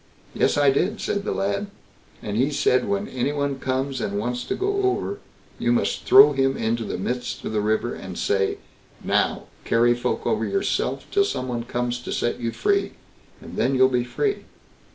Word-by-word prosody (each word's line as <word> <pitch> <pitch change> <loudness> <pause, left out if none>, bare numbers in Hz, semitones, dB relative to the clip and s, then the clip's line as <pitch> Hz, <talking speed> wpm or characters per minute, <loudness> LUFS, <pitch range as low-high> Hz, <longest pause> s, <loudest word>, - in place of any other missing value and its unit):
"Yes - - +2
I 145 -1 +5
did", 195 +10 0
said 200 0 -2
the - - -1
lad, 100 - -1 0.6
"and 105 -1 -3
he 130 +6 +2
said, 130 -3 +2
'When 200 +1 -1
any 130 +2 -1
one 140 -2 -2
comes 130 0 -2
and 100 0 -2
wants 120 +3 -2
to - - -2
go 400 +1 0
over, 395 +1 -1 0.4
you - - +1
must - - 0
throw 405 +2 +8
him 135 0 +1
into 115 +1 -1
the - - -4
midst 125 +6 -4
of - - -3
the 105 - +1
river, 110 +3 0
and 95 -2 -8
say, 95 -1 0 0.5
"Now, - - +1 0.2
carry 120 +1 +3
folk 120 - -2
over - - +1
yourself 390 -1 -1
till 400 - +4
some 130 - -3
one 120 -2 -3
comes 120 0 -2
to 125 - -7
set 120 - -1
you 115 -1 -2
free,"' 400 - 0 0.5
and - - -10
then 135 +1 +2
you'll 130 0 +5
be 125 -2 +1
free." 405 - -2
130 Hz, 195 wpm, -23 LUFS, 120-195 Hz, 0.6 s, throw